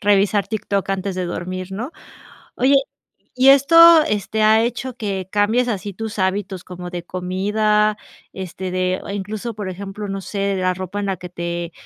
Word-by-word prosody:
revisar 205 0 +2
TikTok 200 -3 -2
antes 195 0 -2
de 185 -1 -2
dormir, 185 +2 -5
¿no? 240 +11 -5 0.6
Oye, 265 +3 +3 0.6
¿y 255 +1 +4
esto, 280 +4 +5
ha 220 - +6
hecho 245 +2 -3
que 195 -4 -3
cambies 220 +4 +2
así 205 -2 -3
tus 220 +1 -6
hábitos, 190 -1 -1
como 180 -1 -8
de 175 -1 -6
comida? 210 +4 0 0.3
Este, 185 0 -6
de 185 0 0
o - - -7
incluso, 205 +3 -4
por 205 -3 -5
ejemplo, 200 +2 -6
no 195 0 -4
sé, 200 0 -2
la 185 0 +1
ropa 185 +2 -5
en 200 - -2
la 190 -1 -1
que 180 - -8
te 170 -1 -4
200 Hz, 165 wpm, -20 LUFS, 185-215 Hz, 0.6 s, ha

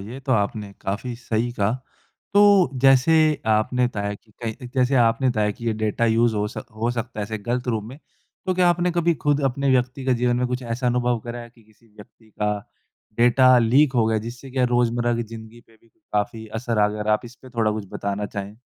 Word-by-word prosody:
ये 115 +7 -8
तो 130 -1 -1
आपने 105 -1 -1
काफ़ी 115 +5 -4
सही 120 0 -2
कहा। 105 0 0 0.6
तो 200 -7 +6
जैसे 135 +3 +5 0.3
आपने 110 +3 +2
बताया 105 -3 -3
कि 110 +1 -19
कई 115 +3 -5
जैसे 130 +1 +2
आपने 120 +2 +3
बताया 105 -3 +1
कि 115 +2 -8
ये 115 - +2
डेटा 110 +1 -1
यूज़ 115 0 +2
हो 105 0 0
सक 125 - -8
हो 115 +2 -1
सकता 115 -3 -4
है 110 - -3
गलत 120 +2 -2
रूप 110 -3 -1
में। 130 +6 -10 0.5
तो 185 - +1
क्या 180 -1 +3
आपने 175 +1 +1
कभी 170 -1 +2
खुद 145 -1 0
अपने 135 +1 0
व्यक्ति 130 +1 0
का 130 - +2
जीवन 120 0 +2
में 125 0 0
कुछ 125 +1 -3
ऐसा 120 +2 -3
अनुभव 120 -1 +1
करा 120 0 -6
कि 115 -1 -24
किसी 110 +2 -26
व्यक्ति 110 +1 -18
का 105 0 +1 0.7
डेटा 125 +1 +6
लीक 130 +5 +4
हो 115 -2 +3
गया 110 -1 +1
जिससे 120 +4 -8
कि 130 -1 +1
रोज़मर्रा 120 -1 +1
की 120 - -1
ज़िंदगी 115 +1 -11
पे 115 - -23
भी 115 - -29
काफ़ी 110 -6 -4
असर 110 0 -3
आ 105 0 +4
गया? 105 0 -5
अगर 105 +1 -1
आप 105 +3 +1
इस 120 +1 -11
पे 130 - -13
थोड़ा 115 -3 +1
कुछ 105 -2 -4
बताना 100 +1 -3
चाहें। 100 +1 -7
120 Hz, 220 wpm, -23 LUFS, 110-125 Hz, 0.7 s, तो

